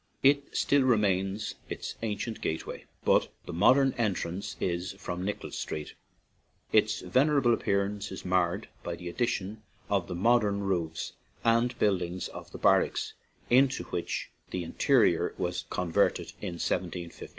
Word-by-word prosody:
It 140 Hz, +1 st, +3 dB
still 140 Hz, 0 st, +4 dB
retains 105 Hz, -4 st, +1 dB, 0.2 s
its -, -, -4 dB
ancient 110 Hz, +1 st, -3 dB
gateway, 80 Hz, -, -3 dB, 0.2 s
but -, -, +4 dB, 0.2 s
the 90 Hz, -, -6 dB
modern 130 Hz, +10 st, +5 dB
entrance 100 Hz, -2 st, -1 dB
is 90 Hz, +1 st, -1 dB
from 90 Hz, -2 st, -5 dB
Nicholas 105 Hz, +2 st, -4 dB
Street. 75 Hz, -, -4 dB, 0.8 s
Its -, -, +3 dB
venerable 135 Hz, -3 st, +3 dB
appearance 100 Hz, -1 st, 0 dB
is 95 Hz, -, -7 dB
marred 90 Hz, +2 st, +1 dB
by 85 Hz, -, -4 dB
the 90 Hz, 0 st, -8 dB
addition 105 Hz, 0 st, -2 dB, 0.3 s
of 95 Hz, -4 st, +1 dB
the -, -, -4 dB
modern 105 Hz, 0 st, +3 dB
roofs 85 Hz, -5 st, -2 dB, 0.3 s
and 115 Hz, +2 st, +3 dB
buildings 90 Hz, -3 st, 0 dB
of -, -, -10 dB
the -, -, -7 dB
barracks -, -, +2 dB, 0.4 s
into 130 Hz, +2 st, +4 dB
which 85 Hz, -, -3 dB, 0.2 s
the 90 Hz, -, -3 dB
interior 85 Hz, -, +3 dB
was 90 Hz, -1 st, -2 dB
converted 85 Hz, -3 st, +1 dB
in 90 Hz, -, -3 dB
1 -, -, -7 dB
751. 85 Hz, -2 st, -3 dB
100 Hz, 140 wpm, -29 LUFS, 90-115 Hz, 0.8 s, modern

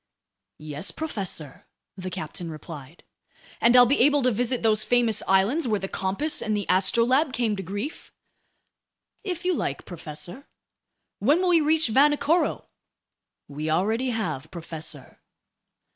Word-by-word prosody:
"Yes, 150 Hz, +2 st, -4 dB
professor," 190 Hz, -, -5 dB, 0.3 s
the 185 Hz, -1 st, -6 dB
captain 165 Hz, 0 st, -5 dB
replied. 155 Hz, -1 st, -10 dB, 0.6 s
"And 235 Hz, +1 st, +5 dB
I'll 245 Hz, 0 st, +9 dB
be 275 Hz, +4 st, +1 dB
able 285 Hz, +2 st, +4 dB
to 255 Hz, -, +3 dB
visit 245 Hz, +2 st, -1 dB
those 215 Hz, -1 st, +3 dB
famous 235 Hz, -3 st, +2 dB
islands 215 Hz, +11 st, +2 dB
where 215 Hz, -3 st, +1 dB
the 195 Hz, -, -4 dB
Compass 195 Hz, +13 st, -2 dB
and 215 Hz, -1 st, -1 dB
the 205 Hz, -, -3 dB
Astrolabe 235 Hz, -, +3 dB
came 230 Hz, -5 st, 0 dB
to 195 Hz, -, -5 dB
grief?" 205 Hz, -, -6 dB, 1.1 s
"If 360 Hz, -3 st, -4 dB
you 365 Hz, -, +2 dB
like, 140 Hz, -, -3 dB
professor." 175 Hz, -, -7 dB, 0.7 s
"When 285 Hz, -, +3 dB
will 370 Hz, 0 st, +1 dB
we 335 Hz, -2 st, +5 dB
reach 310 Hz, -2 st, +2 dB
Vanikoro?" 295 Hz, +7 st, +2 dB, 0.8 s
"We 150 Hz, +2 st, -5 dB
already 220 Hz, +10 st, +1 dB
have, 205 Hz, -, -3 dB
professor." 160 Hz, -5 st, -7 dB
215 Hz, 135 wpm, -25 LUFS, 175-275 Hz, 1.1 s, I'll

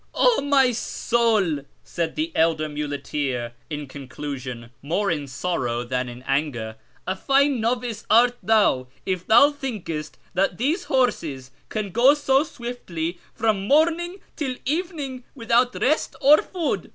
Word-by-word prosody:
" -, -, -4 dB
0, -, -, +4 dB
my 270 Hz, -3 st, +4 dB
soul! 220 Hz, -7 st, +1 dB
" -, -, -38 dB
said 170 Hz, -2 st, -3 dB
the 320 Hz, +2 st, -2 dB
elder 160 Hz, -1 st, +2 dB
muleteer 145 Hz, -4 st, -3 dB, 0.2 s
in 150 Hz, -2 st, -5 dB
conclu 140 Hz, +1 st, -6 dB
sion, 120 Hz, -2 st, -8 dB
more 175 Hz, +8 st, 0 dB
in 150 Hz, -3 st, -2 dB
sorrow 130 Hz, -5 st, -2 dB
than 125 Hz, 0 st, -2 dB
in 120 Hz, +1 st, -10 dB
anger, 130 Hz, -6 st, -1 dB, 0.2 s
" -, -, -34 dB
a 185 Hz, -, 0 dB
fine 275 Hz, +1 st, +2 dB
novice 235 Hz, -1 st, -1 dB
art 240 Hz, +2 st, +5 dB
thou 205 Hz, -13 st, +3 dB, 0.2 s
if 185 Hz, -2 st, -2 dB
thou 285 Hz, +6 st, +7 dB
thinkest 170 Hz, -, -5 dB, 0.2 s
that 185 Hz, -1 st, +1 dB
these 295 Hz, -, 0 dB
horses 155 Hz, -, 0 dB, 0.2 s
can 210 Hz, -3 st, -3 dB
go 250 Hz, +8 st, +5 dB
so 270 Hz, -2 st, +3 dB
swiftly 185 Hz, -, -5 dB, 0.2 s
from 215 Hz, -3 st, 0 dB
morning 340 Hz, -, +2 dB, 0.2 s
till 270 Hz, -5 st, -2 dB
evening 295 Hz, -4 st, -3 dB
without 240 Hz, 0 st, +2 dB
rest 305 Hz, +4 st, +1 dB
or 290 Hz, +3 st, +7 dB
food. 350 Hz, -5 st, -3 dB
210 Hz, 150 wpm, -23 LUFS, -, 0.2 s, thou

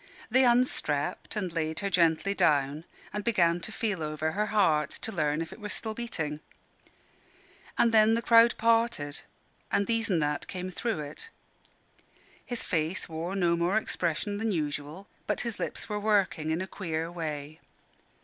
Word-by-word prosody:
They 260 Hz, +2 st, +5 dB
unstrapped 240 Hz, -, +1 dB
and 190 Hz, -5 st, -2 dB
laid 160 Hz, +1 st, -2 dB
her 200 Hz, -, -1 dB
gently 170 Hz, +2 st, +3 dB
down, 150 Hz, -4 st, +2 dB, 0.3 s
and 210 Hz, 0 st, -3 dB
began 175 Hz, -7 st, +3 dB
to 215 Hz, -, -6 dB
feel 210 Hz, -6 st, -2 dB
over 155 Hz, +1 st, -2 dB
her 210 Hz, +5 st, -1 dB
heart, 155 Hz, -8 st, +3 dB
to 225 Hz, -, -5 dB
learn 155 Hz, -4 st, 0 dB
if 165 Hz, -, -10 dB
it -, -, -13 dB
were 210 Hz, -1 st, -6 dB
still 220 Hz, +1 st, -2 dB
beating. 160 Hz, -11 st, -3 dB, 1.4 s
And 235 Hz, -, +4 dB
then 220 Hz, 0 st, +5 dB
the 230 Hz, -, -1 dB
crowd 230 Hz, 0 st, +6 dB
parted, 230 Hz, -11 st, +1 dB, 0.5 s
and 200 Hz, -, +2 dB
These 230 Hz, 0 st, 0 dB
an' 185 Hz, -, +3 dB
That 150 Hz, -1 st, -1 dB
came 185 Hz, 0 st, -5 dB
through 205 Hz, -3 st, -2 dB
it. 150 Hz, -, -8 dB, 1.1 s
His 245 Hz, -2 st, -4 dB
face 165 Hz, +1 st, -1 dB
wore 165 Hz, +3 st, -4 dB
no 175 Hz, -3 st, +2 dB
more 175 Hz, +5 st, +1 dB
expression 205 Hz, 0 st, -1 dB
than 220 Hz, 0 st, 0 dB
usual, 150 Hz, +2 st, -3 dB, 0.2 s
but -, -, 0 dB
his 235 Hz, -3 st, -4 dB
lips -, -, -4 dB
were 210 Hz, -1 st, -2 dB
working 200 Hz, -7 st, +1 dB
in 160 Hz, +3 st, 0 dB
a -, -, -2 dB
queer 165 Hz, -4 st, -3 dB
way. 155 Hz, -3 st, -5 dB
180 Hz, 165 wpm, -29 LUFS, 155-215 Hz, 1.4 s, crowd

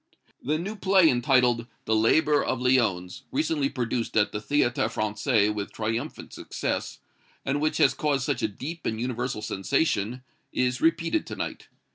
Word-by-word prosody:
"THE 150 Hz, +5 st, 0 dB
NEW 200 Hz, +6 st, -5 dB
PLAY 190 Hz, -3 st, +5 dB
entitled, 120 Hz, -2 st, +2 dB, 0.2 s
'The 110 Hz, -, +2 dB
Laborer 145 Hz, +7 st, +3 dB
of 130 Hz, -, -1 dB
Lyons,' 110 Hz, -9 st, +1 dB
recently 150 Hz, 0 st, 0 dB
produced 120 Hz, -4 st, -2 dB
at 105 Hz, -, +3 dB
the 105 Hz, -, -3 dB
Théâtre 120 Hz, 0 st, +1 dB
Français 105 Hz, 0 st, +1 dB
with 105 Hz, -1 st, -4 dB
triumphant 115 Hz, +6 st, -4 dB
success, -, -, -3 dB, 0.5 s
and 140 Hz, +2 st, 0 dB
which 155 Hz, 0 st, +1 dB
has -, -, +4 dB
caused 140 Hz, -4 st, 0 dB
such 135 Hz, -4 st, -1 dB
a 110 Hz, -, +2 dB
deep 150 Hz, +11 st, -6 dB
and 110 Hz, -, -2 dB
universal 120 Hz, -2 st, -3 dB
sensation, 110 Hz, +3 st, 0 dB, 0.3 s
is 125 Hz, 0 st, 0 dB
repeated 165 Hz, -, +1 dB
to -, -, -5 dB
night. -, -, -5 dB
125 Hz, 155 wpm, -26 LUFS, 110-145 Hz, 0.5 s, PLAY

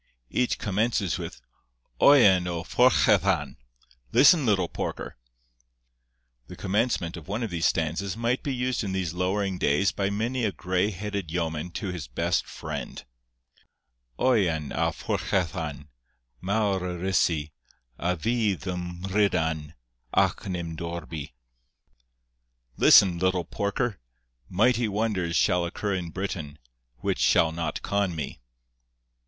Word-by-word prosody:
Each 125 Hz, -1 st, +1 dB
commences 105 Hz, -2 st, 0 dB
with -, -, -7 dB, 0.6 s
'Oian 100 Hz, -11 st, +6 dB
a 85 Hz, -2 st, -3 dB
phorchellan'—listen, 65 Hz, -, +2 dB
little 95 Hz, -5 st, +2 dB
porker! -, -, -5 dB, 1.3 s
The -, -, -9 dB
commencement 100 Hz, -4 st, -1 dB
of 85 Hz, -, -11 dB
one 110 Hz, +5 st, -2 dB
of 110 Hz, -, -3 dB
these 85 Hz, -1 st, +1 dB
stanzas 85 Hz, +5 st, -1 dB
might 120 Hz, +2 st, 0 dB
be 140 Hz, -, -3 dB
used 125 Hz, -1 st, -1 dB
in 95 Hz, -2 st, -3 dB
these 90 Hz, -4 st, -2 dB
lowering 95 Hz, +1 st, -1 dB
days 75 Hz, +8 st, +2 dB
by 100 Hz, 0 st, -1 dB
many 115 Hz, +5 st, -1 dB
a 105 Hz, -, +1 dB
grey 95 Hz, +2 st, 0 dB
headed 100 Hz, -2 st, -4 dB
yeoman 80 Hz, -1 st, -2 dB
to 100 Hz, -, -4 dB
his 85 Hz, -7 st, -5 dB
best -, -, -1 dB
friend:— 70 Hz, -5 st, -6 dB, 1.1 s
'Oian 90 Hz, -, +2 dB
a -, -, +1 dB
phorchellan: 80 Hz, -5 st, -2 dB, 0.5 s
mawr 100 Hz, 0 st, +1 dB
eryssi 90 Hz, -4 st, 0 dB, 0.5 s
A 90 Hz, +1 st, 0 dB
fydd 110 Hz, 0 st, 0 dB
ym 90 Hz, -1 st, -5 dB
Mhrydan, 85 Hz, -6 st, 0 dB, 0.4 s
ac -, -, +2 dB
nim 85 Hz, -3 st, -4 dB
dorbi. 80 Hz, -4 st, -6 dB, 1.4 s
Listen, 90 Hz, +4 st, +6 dB
little 95 Hz, -1 st, +1 dB
porker! 100 Hz, +4 st, -2 dB, 0.5 s
mighty 115 Hz, +5 st, +2 dB
wonders 100 Hz, -5 st, -1 dB
Shall 90 Hz, -3 st, +3 dB
occur 100 Hz, +4 st, -2 dB
in 90 Hz, -3 st, -3 dB
Britain, 80 Hz, -5 st, -5 dB, 0.4 s
which -, -, -1 dB
shall 80 Hz, -, +4 dB
not 80 Hz, -1 st, -4 dB
con 100 Hz, -3 st, 0 dB
me. 75 Hz, -5 st, -5 dB
90 Hz, 120 wpm, -26 LUFS, 85-105 Hz, 1.4 s, Oian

